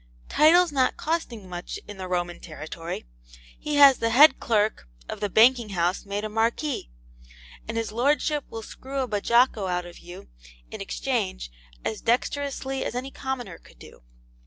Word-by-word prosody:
Titles 340 +3 +5
not 260 -3 +1
costing 275 - -3
much 175 -1 -6
in 205 -1 -9
the 185 -1 -6
Roman 175 -1 -2
territory, 160 - -7 0.5
he 300 -1 -3
has 280 -2 +8
had - - -23
the 230 - +2
head 285 +7 +7
clerk 215 - 0 0.2
of - - -6
the 205 - -2
banking 235 +2 +4
house 180 +1 -1
made 200 +1 -3
a - - -1
Marquis, 230 - -1 0.8
and 225 +1 -4
his 225 -1 -2
Lordship 290 +5 +1
will 225 0 -7
screw 270 +4 -5
a 260 - -2
BAJOCCO 220 -1 +2
out 180 0 -1
of 175 0 -12
you 175 - -11 0.4
in - - -7
exchange - - -3 0.3
as 220 - -3
dexterously 270 +2 -1
as - - -4
any 260 +2 -4
commoner 250 -11 -5
could - - -20
do. - - -15
225 Hz, 165 wpm, -25 LUFS, 180-265 Hz, 0.8 s, has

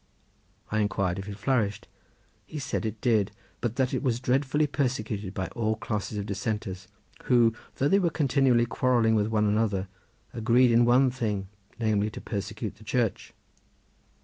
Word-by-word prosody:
I 110 - +1
inquired 100 -3 0
if 95 +2 -6
it 100 - -6
flourished. 105 -3 0 0.6
He 155 - -7
said 135 -5 -2
it 110 0 -6
did, 110 -5 +2 0.3
but 120 -1 -2
that 130 -2 0
it - - 0
was 125 -4 0
dreadfully 135 +4 +1
persecuted 110 -8 -2
by 95 - -1
all 110 -2 -1
classes 105 -1 -3
of 100 - -3
dissenters, 100 -1 -4 0.4
who 120 -3 +4 0.2
though 140 - +1
they 195 +6 +4
were 175 -3 +2
continually 135 -6 +3
quarrelling 120 -1 +2
with 105 -1 +2
one 110 -1 +1
another 105 -2 +1 0.4
agreed 120 +2 +4
in 120 +1 +5
one 125 +2 +4
thing 105 -6 -2 0.3
namely 110 -2 +1
to - - -8
persecute 105 0 -5
the 110 - -15
Church. 115 -2 -1
110 Hz, 160 wpm, -27 LUFS, 105-125 Hz, 0.6 s, in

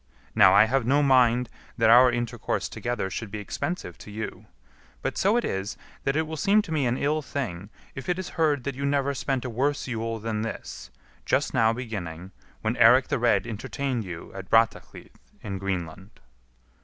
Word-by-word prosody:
Now, 95 +1 +6
I 105 - +8
have 130 +3 +1
no 145 +3 +3
mind 125 -3 +4 0.3
that 115 -1 +4
our 125 +1 +7
intercourse 120 -1 -2
together 120 -6 -3
should 110 +4 -5
be 105 - -6
expensive 175 - -5
to - - -11
you; 110 +2 -6 0.6
but - - -2
so 205 +5 +2
it 240 - 0
is, 95 +2 -3 0.3
that 135 - +1
it 160 - +2
will 160 0 -6
seem 205 +5 +3
to 170 - -9
me 145 -5 +1
an 120 +2 0
ill 150 +3 0
thing 105 - -5 0.2
if 130 +6 -7
it 180 - +1
is 185 - -5
heard 150 -5 +1
that 140 - -3
you 135 +2 -6
never 140 0 +1
spent 135 -1 -2
a - - -2
worse 140 +5 0
Yule 115 -2 -3
than 110 -1 -3
this, 110 - -6 0.3
just - - 0
now 110 0 +4
beginning, 95 -7 -6 0.3
when 110 +3 -1
Eirik 125 +4 +6
the 140 -3 0
Red 110 -5 +2
entertained 120 +3 -3
you 90 -4 -8
at 95 -1 -8
Brattahlid, 115 0 +1 0.3
in 100 -2 -4
Greenland." 95 +1 -5
120 Hz, 190 wpm, -26 LUFS, 105-140 Hz, 0.6 s, I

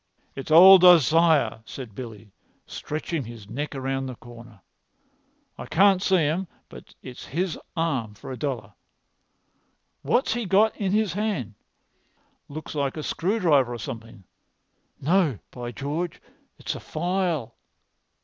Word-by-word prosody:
"It's 135 - -7
old 185 +3 +9
Isaiah," 165 -5 +5
said 120 -1 -9
Billy, 110 -2 -9 0.3
stretching 155 0 -4
his 115 -3 -11
neck 145 +7 -5
round 135 0 -3
the 130 - -7
corner. 120 -3 -14 1.0
"I - - -7
can't 195 +1 +4
see 190 -1 +3
him, 165 +6 -1 0.2
but - - -14
it's 125 -1 -9
his 175 +2 -2 0.2
arm[Pg 130 -10 -1
248] - - -21
for - - -8
a - - -4
dollar. 120 -9 -4 1.3
What's 245 -2 +1
he 235 -3 -3
got 210 +4 +3
in 195 -3 -2
his 210 -3 +1
hand? 195 - -2 1.0
Looks 155 +2 -7
like 140 -1 -2
a 155 - -4
screwdriver 160 - +1
or - - -6
something. 115 -2 -8 0.8
No, 160 - +2
by 120 -1 -6
George, 150 +7 -4 0.4
it's - - -4
a - - -7
file." 170 -7 -2
150 Hz, 135 wpm, -25 LUFS, 120-180 Hz, 1.3 s, old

